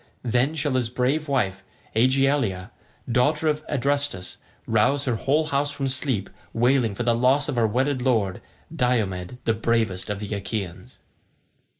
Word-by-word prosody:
Then 125 +5 +1
shall 145 -2 0
his 125 -3 0
brave 135 +6 0
wife 95 -9 0 0.3
Aegialeia, 130 -5 +2 0.4
daughter 145 +6 +2
of 150 0 0
Adrestus, 140 -8 -1 0.3
rouse 115 +6 +2
her 125 - +1
whole 140 +7 +1
house 145 -1 0
from 140 -1 -2
sleep, 130 -6 0 0.3
wailing 120 -2 +2
for 120 - -2
the 120 0 +3
loss 130 +4 +3
of - - -2
her 115 -2 +3
wedded 130 +4 0
lord, 110 -7 +1 0.3
Diomed 110 -4 0
the 115 - +3
bravest 110 -4 0
of 105 -1 -2
the 105 0 -5
Achaeans." 100 -2 -5
125 Hz, 145 wpm, -24 LUFS, 110-140 Hz, 0.4 s, the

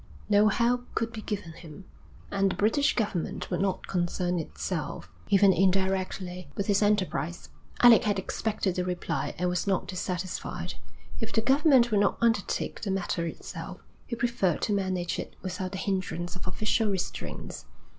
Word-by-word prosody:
No 210 0 +6
help 240 +3 +1
could 230 0 -1
be 220 - -5
given 205 -6 -4
him, 155 -2 -11 0.5
and 195 0 +2
the - - -3
British 225 +10 +2
Government 205 -7 -2
would - - 0
not 190 -1 0
concern 175 0 0
itself, 160 - -4 0.2
even 195 -1 +6
indirectly, 185 -1 0
with 200 - -1
his 200 0 +2
enterprise. 185 -5 0 0.3
Alec 240 -3 +8
had 205 -1 +2
expected 200 0 -1
the 180 - -1
reply 175 -5 -2
and 180 - 0
was 180 +2 -1
not 190 -2 +1
dissatisfied. 185 -1 -3 0.5
If 225 -1 -3
the 225 - +2
government 265 -1 +5
would 210 - +4
not 200 - +2
undertake 225 -4 0
the 205 - -3
matter 180 -3 -1
itself, - - -7 0.3
he 235 - -3
preferred 235 -7 0
to 210 - +1
manage 185 -3 -1
it - - -6
without 185 0 -3
the - - -3
hindrance 185 -3 -2
of 180 - -7
official 215 +3 +1
restraints. 190 -2 -4
195 Hz, 160 wpm, -28 LUFS, 180-215 Hz, 0.5 s, Alec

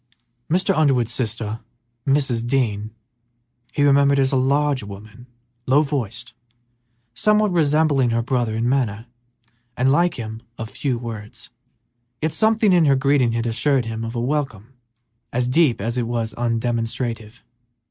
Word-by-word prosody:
Mr. 185 +3 +1
Underwood's 130 -7 +2
sister, 115 -2 -3 0.5
Mrs. 135 -4 +1
Dean, 110 -5 0 0.8
he 145 - 0
remembered 140 0 +4
as 135 -1 +2
a - - +1
large 140 +1 +2
woman, 105 +4 -11 0.4
low 140 +4 +4
voiced, 125 -5 -4 0.8
somewhat 210 - +2
resembling 150 -5 +2
her 115 0 0
brother 120 -3 -1
in 115 +2 0
manner, 120 -5 0 0.7
and 130 +2 +3
like 170 +4 +2
him, 110 -1 -6 0.2
of 110 0 -6
few 130 -4 -2
words, 115 -2 -8 0.7
yet 155 0 -1
something 220 -1 +3
in 175 -3 +4
her 140 -2 +4
greeting 135 -3 +2
had 115 0 -1
assured 125 +3 +1
him 115 0 -4
of 115 +1 -5
a - - -1
welcome 130 -3 -3 0.6
as 125 +1 0
deep 130 -2 +3
as 115 +5 -2
it 120 - -1
was 115 -1 -2
undemonstrative. 115 -1 -3
125 Hz, 140 wpm, -21 LUFS, 115-140 Hz, 0.8 s, remembered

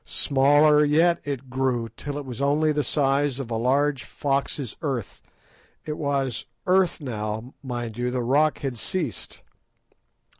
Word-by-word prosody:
Smaller 145 +2 +4
yet 165 +4 +3
it 140 -2 -4
grew, 130 -2 0
till 140 +6 -6
it 145 - -5
was 125 0 -6
only 150 +2 +2
the 150 0 +1
size 140 -1 +1
of 125 -3 -5
a - - 0
large 135 +4 +1
fox's 140 -3 -2
earth—it 145 - -7
was 140 -4 -1 0.2
earth 185 -1 +3
now, 110 -2 -4
mind 120 -4 -5
you; 125 0 0
the 125 0 -2
rock 145 +5 +3
had 130 -5 -3
ceased. 175 - -3
140 Hz, 140 wpm, -25 LUFS, 125-150 Hz, 0.2 s, Smaller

